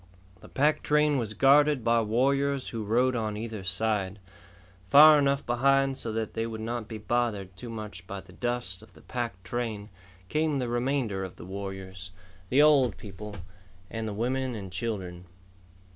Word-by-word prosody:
The - - -14
pack 150 +3 +2
train 150 -1 +2
was 110 -3 -4
guarded 145 0 +5
by 115 0 +3
warriors 135 +5 +1
who 115 -2 -4
rode 125 +5 +2
on 110 -2 -2
either 110 -2 -5
side. 95 0 -1 0.7
Far 150 +4 +9
enough 140 0 +1
behind 135 +2 +2
so 120 -4 -4
that 110 -1 -3
they 115 0 -2
would 110 -1 -6
not 115 0 -4
be 110 - -6
bothered 105 -4 -1
too 120 +7 -8
much 105 -5 -8
by 100 - -5
the 95 -1 -17
dust 120 -5 -3
of 110 -3 -17
the - - -17
pack 115 -7 -4
train, 110 0 -4 0.4
came 155 +2 0
the 125 -3 -2
remainder 120 -5 -1
of 95 -1 -7
the - - -11
warriors, 95 -1 -7 0.4
the 140 +6 +5
old 135 -8 +4
people, 105 +1 -9 0.6
and 115 -1 -3
the 105 - -3
women 125 +3 -1
and 95 -4 -7
children. 90 -4 -4
115 Hz, 170 wpm, -28 LUFS, 100-130 Hz, 0.7 s, Far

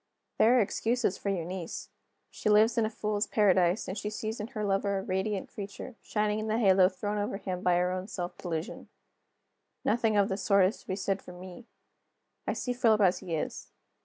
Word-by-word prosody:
There 240 +3 +6
are - - +5
excuses 225 0 0
for 200 - -2
Eunice. 180 -2 -4 0.4
She - - -2
lives 215 +2 +5
in 230 -2 +2
a - - -4
fools' 210 -1 -2
paradise; 185 -2 +3
and 190 - -4
she 210 0 -3
sees 215 +1 -4
in 210 - -4
her 215 -4 -4
lover 200 0 +1
a 190 - -3
radiant 190 +1 -2
creature, 200 +5 -7
shining 210 0 0
in 215 - -3
the 220 +1 +1
halo 190 -4 +5
thrown 205 +2 -3
over 205 -1 -2
him 185 -2 -4
by 180 -2 +3
her 180 +1 +2
own 185 +1 -3
self 180 -4 -5
delusion, 165 -2 -5 1.0
Nothing 220 -1 +2
of 200 -1 +4
this 195 -1 -3
sort 200 -2 +4
is 195 - -1
to - - -25
be 185 - -1
said 195 0 -1
for 180 - -11
me. 185 +6 -11 0.8
I - - +1
see 250 - -2
Philip 225 -3 +3
as 185 -2 +4
he 170 -3 -4
is. 155 - -4
200 Hz, 205 wpm, -29 LUFS, 185-215 Hz, 1.0 s, There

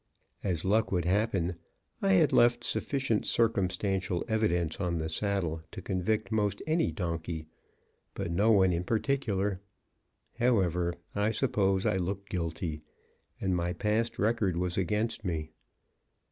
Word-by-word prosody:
As 90 -4 -1
luck 110 +4 +2
would 90 -3 +1
happen, 95 -2 +1 0.4
I 95 - +3
had 95 - +4
left 120 0 +4
sufficient 135 -6 0
circumstantial 95 -4 +1
evidence 90 -8 0
on 90 -3 0
the 80 0 -2
saddle 85 -2 -1
to - - -8
convict 100 +3 -1
most 105 -2 +1
any 160 +1 +1
donkey, 85 -4 -3 0.7
but 85 - -3
no 100 +6 +3
one 95 -4 +5
in 85 +1 -1
particular. 105 -4 0 0.8
However, 90 -8 +2 0.2
I 105 +1 +1
suppose 100 -5 +1
I - - +2
looked 100 +2 -3
guilty, 85 -3 -3 0.6
and 95 -1 0
my 85 0 -1
past 110 +4 0
record 105 -5 +1
was 90 0 -1
against 105 +5 -1
me. 80 -5 -3
95 Hz, 130 wpm, -30 LUFS, 85-110 Hz, 0.8 s, one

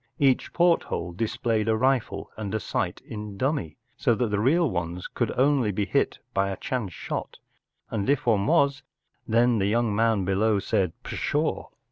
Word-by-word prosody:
Each 135 -4 +2
porthole 170 - +1
displayed 115 +2 -1
a 110 -1 +2
rifle 130 0 0
and 110 0 -3
sight 90 - -2
in 105 -2 -7
dummy, 130 - -1 0.2
so 130 -5 +2
that 120 0 0
the 105 - +1
real 160 +10 +3
ones 90 -4 -3
could - - -2
only 130 -4 +3
lie 100 +2 -1
hit - - 0 0.2
by 100 0 +1
a 95 - -4
chance 120 -8 -3
shot, - - -5 0.5
and 110 +1 -1
if 140 -2 +2
one 105 -4 +2
was, 140 0 +3 0.5
then 120 0 +3
the 95 - +1
young 115 0 +1
man 110 -3 +2
below 100 +3 +2
said 95 -4 0
“Pshaw!" - - -1
110 Hz, 165 wpm, -26 LUFS, 100-130 Hz, 0.5 s, real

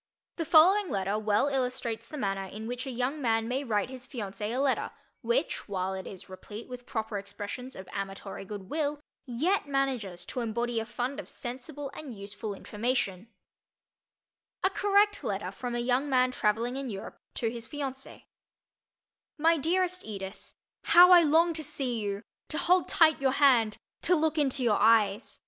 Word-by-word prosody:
The 330 - -1
following 355 +5 +6
letter 195 +1 -1
well 210 +4 +2
illustrates 250 -4 -2
the 300 - -7
manner 195 -5 -1
in 210 +3 -8
which 245 +3 -4
a - - -3
young 255 +5 -2
man 225 -2 +1
may 260 +3 -1
write 220 -1 0
his 255 0 -9
fiancée 210 -4 -5
a 240 - -2
letter 275 0 +1 0.3
which, 475 - -1
while 190 -1 -1
it 190 0 -6
is 190 - -9
replete 205 +4 -9
with 250 -1 -9
proper 220 -4 -3
expressions 205 +6 -7
of 190 - -9
amatory 195 0 -5
good 195 -1 -8
will, 295 -1 -1 0.3
yet 300 +10 0
manages 255 -11 -1
to - - -4
embody 235 0 -1
a 225 - -4
fund 255 +4 -3
of - - -8
sensible 275 +3 -6
and 270 -6 -8
useful 205 +1 -6
information: 210 -2 -2 1.4
A 380 - +3
Correct 410 0 +3
Letter 195 -2 -2
from 240 +4 -5
a - - 0
Young 250 +4 +1
Man 255 -1 +3
Traveling 230 +3 0
in 270 -2 -4
Europe 195 -3 -7 0.2
to 230 - 0
His 235 -1 -7
Fiancée 270 -3 -6 1.1
MY 325 +2 +4
DEAREST 365 +4 0
EDITH: 195 -2 -8 0.3
How 350 +2 +8
I 355 -1 +10
long 330 +2 +4
to 315 -1 -3
see 270 -5 -2
you—to 205 +8 -5
hold 360 +1 +3
tight 315 -3 +4
your 265 -1 +2
hand—to 265 - +3
look 315 -1 +1
into 270 -2 +1
your 220 -4 +3
eyes. 215 -1 +3
245 Hz, 165 wpm, -29 LUFS, 210-290 Hz, 1.4 s, I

